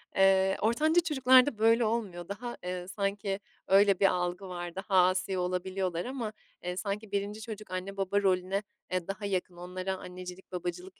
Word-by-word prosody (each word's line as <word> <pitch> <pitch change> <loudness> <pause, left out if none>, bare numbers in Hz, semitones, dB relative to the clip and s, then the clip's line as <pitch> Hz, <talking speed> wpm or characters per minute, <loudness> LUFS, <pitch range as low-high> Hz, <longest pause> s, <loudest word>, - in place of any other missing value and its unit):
eee, 190 0 +4
ortanca 310 +10 +3
çocuklarda 260 -5 +5
böyle 225 +2 +4
olmuyor. 205 -6 -2
Daha, 240 +4 -5
eee, 180 0 -4
sanki 195 +1 -2 0.3
öyle 195 0 +5
bir 200 - +4
algı 180 +1 -1
var, 175 -1 -5
daha 190 -2 +4
asi 185 +1 0
olabiliyorlar 180 -1 -1
ama. 245 -4 -4 0.3
Eee, 180 0 -3
sanki 200 +2 -3
1'nci 205 +2 -2
çocuk 215 -2 -8
anne 185 +2 -4
baba 195 +1 +1
rolüne, 190 +1 +1 0.3
eee, 185 -2 -1
daha 200 +1 -4
yakın 185 -2 -2
onlara 185 +2 -4
annecilik 180 0 -9
babacılık 180 +1 -5
195 Hz, 160 wpm, -30 LUFS, 180-210 Hz, 0.3 s, çocuklarda